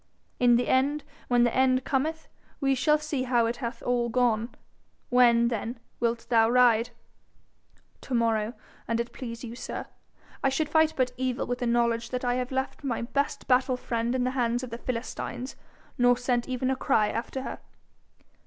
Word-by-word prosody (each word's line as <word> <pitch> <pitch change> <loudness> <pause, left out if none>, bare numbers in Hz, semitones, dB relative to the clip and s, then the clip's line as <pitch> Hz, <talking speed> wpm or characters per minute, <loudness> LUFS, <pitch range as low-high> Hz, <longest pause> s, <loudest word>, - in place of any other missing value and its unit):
In 245 -1 +5
the 245 - +1
end, 280 +3 +2 0.2
when 245 -1 +4
the 240 - +1
end 260 0 +3
cometh, 310 +5 -1 0.3
we 270 -1 +2
shall 285 +4 +3
see 300 -3 -3
how 245 -2 +2
it 235 +1 -2
hath 235 -2 -5
all 240 -1 +1
gone. 235 -1 +1 0.6
When, 235 -1 +5
then, 230 +1 -4 0.2
wilt 235 0 -1
thou 225 -2 +4
ride?' 240 -2 +4 1.1
'To 260 - -3
morrow, 225 -1 +1 0.3
an' 230 - 0
it 235 0 -3
please 235 -2 -7
you, 235 -1 -6
sir. - - -5 0.6
I 270 - +4
should 290 +3 -1
fight 315 0 +3
but 255 -1 +1
evil 255 -1 -1
with 245 0 -3
the 245 - -1
knowledge 235 -1 +1
that 250 0 -3
I 245 - +2
had 250 +1 -2
left 265 +2 -3
my 245 -4 -2
best 280 +4 -2
battle 255 0 +3
friend 235 0 -2
in 255 - +1
the 255 - 0
hands 245 -1 0
of 250 - -7
the 230 - -6
Philistines, 250 +1 -4 0.4
nor 245 0 +5
sent 245 0 -1
even 255 +1 0
a - - +1
cry 220 -5 +2
after 245 +3 -4
her.' - - -6
245 Hz, 180 wpm, -27 LUFS, 235-260 Hz, 1.1 s, In